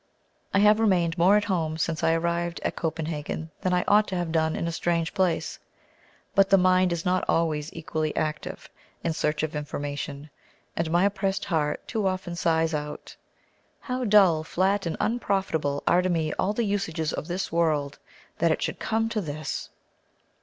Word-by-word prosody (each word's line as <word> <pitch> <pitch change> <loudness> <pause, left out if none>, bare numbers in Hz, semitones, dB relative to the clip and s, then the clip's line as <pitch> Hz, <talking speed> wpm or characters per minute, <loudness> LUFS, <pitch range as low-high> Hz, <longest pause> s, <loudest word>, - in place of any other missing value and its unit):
I - - +2
have 210 +2 +5
remained 180 -6 +2
more 185 +4 +5
at 210 - +1
home 165 -6 -1
since 160 0 -2
I 165 - +4
arrived 170 +1 -1
at - - -1
Copenhagen 160 -1 -3
than 185 - 0
I 180 0 +2
ought 210 +1 +5
to 190 - -3
have 175 -2 -2
done 160 -1 +1
in 170 - -2
a - - -1
strange 165 0 -1
place, 185 -3 0 0.7
but 195 0 +4
the 195 - +6
mind 185 0 +4
is 170 0 -2
not 185 0 +2
always 155 -2 +1
equally 155 -1 -3
active 155 -1 -3 0.4
in 165 - 0
search 150 0 -1
of 155 0 -2
information, 145 0 -5 0.4
and 165 -1 -1
my 175 +3 +3
oppressed 195 -1 -1
heart 155 -4 -1
too 215 -4 0
often 185 -2 -3
sighs 165 -1 +1
out 150 0 -5 0.6
"How 255 0 -3
dull, 195 -8 +5
flat, 190 +3 0
and 165 - -3
unprofitable 190 -11 0
Are 180 - +4
to 185 - -1
me 160 -3 0
all 205 - +1
the 230 +1 0
usages 165 -6 -1
of - - -4
this 180 +2 -3
world: 155 -4 0 0.4
That 170 - +3
it - - 0
should - - -3
come 225 0 0
to 220 -2 -1
this!" 155 -3 -5
170 Hz, 180 wpm, -26 LUFS, 160-190 Hz, 0.7 s, the